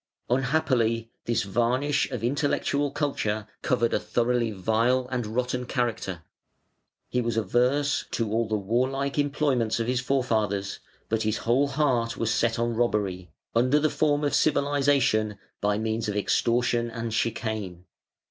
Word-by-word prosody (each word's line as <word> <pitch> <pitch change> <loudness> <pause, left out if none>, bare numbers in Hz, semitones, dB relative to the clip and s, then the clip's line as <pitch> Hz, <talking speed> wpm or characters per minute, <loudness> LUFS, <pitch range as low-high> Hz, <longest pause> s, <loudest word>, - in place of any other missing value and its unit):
Unhappily, 125 -4 +1
this 120 -1 +1
varnish 125 +8 +1
of 125 -4 -5
intellectual 145 +2 0
culture 110 -8 -2 0.2
covered 120 -2 +1
a - - +2
thoroughly 120 -1 0
vile 115 +5 +1
and 125 -4 -2
rotten 125 +2 -1
character. 110 - -2 0.8
He 125 - 0
was 115 -1 -2
averse 130 +6 +1
to 115 -3 -2
all 115 +1 +1
the 110 0 0
warlike 130 +7 0
employments 140 -6 +1
of 115 - 0
his 125 +1 0
forefathers, 110 -7 0 0.3
but 110 0 0
his 110 0 0
whole 130 +5 +3
heart 135 -5 0
was 115 0 0
set 115 -1 +1
on 120 0 0
robbery, 105 -6 -1 0.3
under 130 +5 +4
the 155 0 +2
form 150 -1 +1
of 145 - 0
civilisation, 140 -7 +2 0.2
by 105 0 +1
means 110 0 -1
of 105 - -3
extortion 120 +2 +1
and 115 -1 -4
chicane. 110 -6 -2
120 Hz, 140 wpm, -26 LUFS, 110-135 Hz, 0.8 s, under